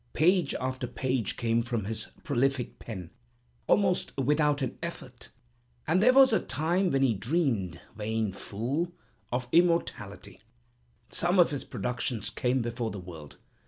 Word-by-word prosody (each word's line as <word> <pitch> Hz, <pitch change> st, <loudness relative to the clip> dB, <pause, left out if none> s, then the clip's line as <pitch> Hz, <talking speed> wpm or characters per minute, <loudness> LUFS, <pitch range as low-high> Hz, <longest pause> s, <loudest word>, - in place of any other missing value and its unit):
Page 175 Hz, -1 st, +3 dB
after 130 Hz, 0 st, -3 dB
page 125 Hz, -2 st, -1 dB
came 115 Hz, -1 st, +1 dB
from 115 Hz, -3 st, -2 dB
his 110 Hz, +1 st, -4 dB, 0.2 s
prolific 135 Hz, -4 st, 0 dB
pen, 95 Hz, -7 st, -7 dB, 0.6 s
almost 190 Hz, -7 st, +2 dB
without 145 Hz, +1 st, +2 dB
an 130 Hz, -, -3 dB
effort; 130 Hz, -7 st, -7 dB, 0.6 s
and 180 Hz, +4 st, +2 dB
there 250 Hz, +4 st, +7 dB
was 265 Hz, -2 st, +7 dB
a -, -, +4 dB
time 170 Hz, +8 st, 0 dB
when 135 Hz, -2 st, +2 dB
he 125 Hz, -4 st, +4 dB
dreamed 110 Hz, -, 0 dB, 0.2 s
(vain 110 Hz, -1 st, -1 dB
fool!) 130 Hz, -, -2 dB, 0.4 s
of 125 Hz, 0 st, -1 dB
immortality. 165 Hz, -, +1 dB, 0.7 s
Some 175 Hz, +2 st, +1 dB
of 175 Hz, -3 st, +6 dB
his 145 Hz, -, -3 dB
productions 120 Hz, -3 st, -3 dB
came 125 Hz, 0 st, 0 dB
before 120 Hz, 0 st, -2 dB
the 105 Hz, -, -6 dB
world. 85 Hz, -5 st, -10 dB
130 Hz, 140 wpm, -29 LUFS, 115-160 Hz, 0.7 s, there